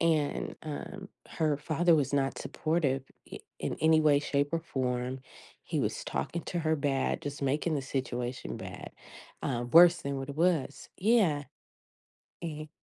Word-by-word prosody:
And, 155 -3 +1
um, 190 +6 -6 0.2
her 155 -3 0
father 165 +3 +2
was 145 -2 +1
not 135 -1 +1
supportive 145 -5 0 0.3
i - - -5 0.2
in - - -2
any 160 0 +5
way, 150 -2 +5
shape, 145 0 0
or 165 - +2
form. 125 -3 -2 0.4
He - - -2
was - - -1
talking 170 - -3
to 175 - -3
her 160 -1 +1
bad, 140 -2 0
just 145 0 -5
making 150 +4 +1
the 135 - -2
situation 125 -2 -3
bad - - -8 0.5
uh, 120 -3 -1
worse 175 +1 +9
than 140 0 -2
what 135 +1 -5
it 140 - -8
was 165 -4 +1
Yeah. 190 -9 +3 1.0
Mhm. 155 -2 -5
145 Hz, 155 wpm, -30 LUFS, 135-165 Hz, 1.0 s, worse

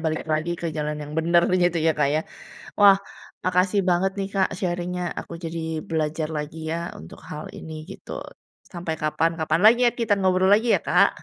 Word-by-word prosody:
balik 160 -1 -2
lagi 160 +2 -1
ke 170 - -4
jalan 150 0 -2
yang 150 - -9
bener 170 +1 +4 0.2
gitu 175 -1 +2
ya, 160 0 +3
Kak 140 - +3
ya? 150 +2 +1 0.6
Wah, 200 -1 +7 0.4
makasih 185 +2 +2
banget 180 +2 +2
nih, 195 - -1
Kak, 190 -1 +2
sharing-nya 180 -1 -2
aku - - -9
jadi 160 -1 -4
belajar 155 -1 -1
lagi 155 +2 -5
ya 170 +1 -3
untuk 80 +2 -11
hal 150 0 -7
ini 160 - -8 0.2
gitu. 195 - -8 0.5
Sampai 170 -2 -3
kapan-kapan 160 +1 0
lagi 235 +3 +7
ya, - - -9
kita 230 -3 +2
ngobrol 190 +1 +4
lagi 225 +3 +3
ya, - - -8
Kak. - - +5
170 Hz, 180 wpm, -24 LUFS, 155-185 Hz, 0.6 s, Wah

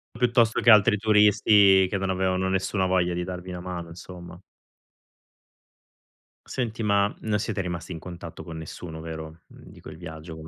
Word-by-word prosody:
Piuttosto 120 -1 +2
che 120 - +4
altri 105 0 +6
turisti 105 -2 +5
che 100 - -1
non 95 0 -2
avevano 95 0 0
nessuna 95 0 0
voglia 90 -1 +1
di 90 0 -2
darvi 90 0 -7
una 90 - -6
mano 90 -2 -6
insomma. 90 0 -11 2.1
Senti, 120 -3 -3
ma 100 -1 +2
non 105 -1 0
siete 105 -1 -3
rimasti 90 0 -4
in 80 - -6
contatto 85 -1 -9
con 80 -1 -8
nessuno, 80 0 -8
vero, 80 0 -8
mhmm, - - -17
di - - -15
quel 80 - -11
viaggio. 80 -1 -9
95 Hz, 160 wpm, -25 LUFS, 85-105 Hz, 2.1 s, altri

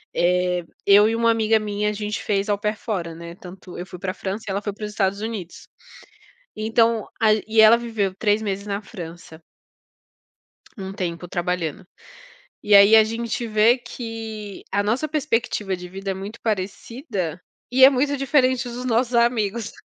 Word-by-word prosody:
eh, 180 0 +1 0.2
eu 205 +2 +6
e 225 - 0
uma 230 0 +3
amiga 220 -1 +2
minha, 210 0 -1
a - - -2
gente 210 0 -4
fez 200 0 0
Au 205 - +2
Pair 210 +1 -1
fora, 180 -8 -4
né, 170 +1 -9
tanto 185 0 -11
eu 175 - -5
fui 180 -1 -10
pra 185 -1 -2
a - - -10
França 200 +4 -5
e - - -2
ela 200 +1 -2
foi 205 -2 -4
para 210 +1 -6
os 210 - -6
Estados 200 -1 0
Unidos, 215 -6 -6 0.9
então 225 +1 +2 0.2
aí 215 -1 +3
e 220 0 +4
ela 220 +1 +8
viveu 225 -5 -2
3 210 -1 +2
meses 200 -1 -3
na 200 0 -2
França. 170 -5 -10 1.4
Um 190 -2 -6
tempo 180 -2 -4
trabalhando. 175 0 -3 0.8
E 210 -1 +3
aí 200 +2 +8
a 220 - +8
gente 230 +1 -3
vê 220 +3 +4
que, 225 -4 -7
a 200 +1 +1
nossa 235 +9 -1
perspectiva 230 -9 -1
de 180 0 -9
vida 195 +2 -5
é - - -1
muito 195 +4 -8
parecida 200 - -3 0.3
e 260 +1 +7
é 265 - +10
muito 285 +2 0
diferente 260 -3 +2
dos 245 +1 -6
nossos 245 0 +1
amigos 235 -2 +1
210 Hz, 180 wpm, -22 LUFS, 190-230 Hz, 1.4 s, é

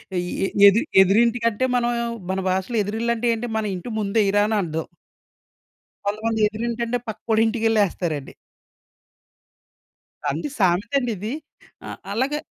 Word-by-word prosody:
ఆహ్, - - +1
ఈ - - -4 0.2
ఎ - - 0 0.2
ఎదిరి 225 +9 +4 0.2
ఎదురింటి 230 +5 +3
కంటే, 230 +3 +1
మనము 240 0 0 0.4
మన 190 - -1
భాషలో 190 +5 -1
ఎదురిల్లంటే 230 +3 -1
ఏంటి? 240 +1 -5
మన 220 - -1
ఇంటి 180 +7 -7
ముందేయిరా 205 0 +2
అని 220 -1 0
అర్థం. 160 -2 -3 1.2
కొంతమంది 220 +2 -1
ఎదురింటంటే, 235 +2 -2
పక్కోడింటికెళ్ళేస్తారండి. 220 - 0 2.0
అండి, 295 - -3
సామెతండిది 215 +4 0 0.5
ఆహ్, - - -7
అల్లగే... 265 +7 0
220 Hz, 110 wpm, -23 LUFS, 200-235 Hz, 2.0 s, ఎదిరి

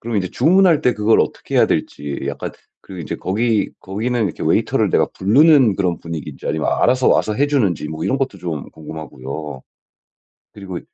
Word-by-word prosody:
그럼 115 -2 -3
이제 95 - -1
주문할 180 -2 +4
때 125 - +2
그걸 105 +1 +3
어떻게 - - -2
해야 - - +6
될지 70 -1 -3
약간 - - -4
그 - - -23 0.3
그리고 95 -2 -8
인제 - - -4
거기 110 +2 0
거기는 110 +4 -2
이렇게 90 - -4
웨이터를 - - +1
내가 - - +3
불르는 130 - +4
그런 90 -4 0
분위기인지 80 -4 -7
아니면 80 0 -1
알아서 130 0 +2
와서 105 - +2
해 145 +7 +1
주는지 100 - 0
뭐 80 0 -5
이런 135 - 0
것도 135 -1 -2
좀 80 -5 -5
궁금하고요. 75 -2 -8 0.9
그리고 95 -4 -7
100 Hz, 410 characters per minute, -19 LUFS, 80-125 Hz, 0.9 s, 해야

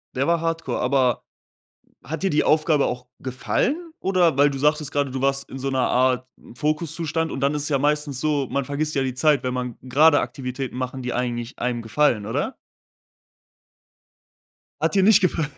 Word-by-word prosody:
Der 135 +2 0
war 170 -1 +2
Hardcore, 165 -6 -2
aber 125 -2 +1 0.8
hat 155 +4 -5
dir 195 - +1
die 150 - +2
Aufgabe 155 -2 +3
auch 125 0 -4
gefallen, 130 - -1 0.2
oder 180 -6 +2
weil 145 +1 +5
du 135 - -5
sagtest 150 +1 +1
grade, 145 -1 0
du 130 0 -4
warst 135 0 +1
in 135 - -8
so 135 +1 -2
'ner 130 -1 +1
Art 130 0 +2 0.3
Fokuszustand 160 +3 -1
und 135 - -4
dann 140 +2 +1
ist 150 - -1
es 145 - 0
ja 140 -3 +1
meistens 145 -1 0
so, 145 -3 0
man 140 - -1
vergisst 150 +3 -2
ja 135 - +1
die 130 -1 -2
Zeit, 150 +2 +3
wenn 125 0 -1
man 125 -2 -4
grade 145 +3 +5
Aktivitäten 125 +1 -5
machen, 130 +1 -4
die 125 0 -3
eigentlich 120 -1 -3
einem 120 -1 -1
gefallen, 115 -2 +1
oder? 140 - -2 2.3
Hat - - 0
dir 195 - +4
nicht 205 0 +6
gefallen? 165 -4 +1
140 Hz, 185 wpm, -23 LUFS, 125-155 Hz, 2.3 s, nicht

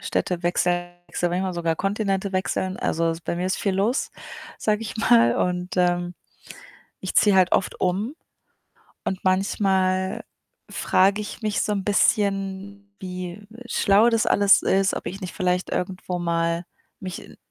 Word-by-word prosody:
Städte 180 -1 -2
wechseln, 175 0 0 0.3
manchmal 180 +1 0
sogar 165 -1 -1
Kontinente 195 0 -1
wechseln. 185 0 -1
Also, 165 0 0
es 165 0 -5
bei 170 - -3
mir 180 +1 -1
ist 190 - 0
viel 195 -2 0
los, 210 +8 0 0.5
sage 215 0 0
ich 225 - -6
mal, 120 - +4
und, 180 0 -1
ähm, 175 0 +1 0.9
ich - - -5
ziehe 205 -2 +5
halt 185 -1 +4
oft 190 - +1
um 195 +9 0 0.9
und 190 - -2
manchmal 190 0 +1 0.5
frage 195 +3 +2
ich 210 - -8
mich 215 -1 0
so 210 - -1
'n 200 -2 -2
bisschen, 200 -1 0
wie 185 +1 -7 0.2
schlau 215 -1 +4
das 230 -1 +2
alles 200 0 +5
ist, 195 +1 +2
ob - - -6
ich 195 +3 -5
nicht 185 -2 -6
vielleicht 180 0 0
irgendwo 180 0 -3
mal 170 0 0 0.4
mich 185 -2 -8
185 Hz, 145 wpm, -24 LUFS, 180-200 Hz, 0.9 s, ziehe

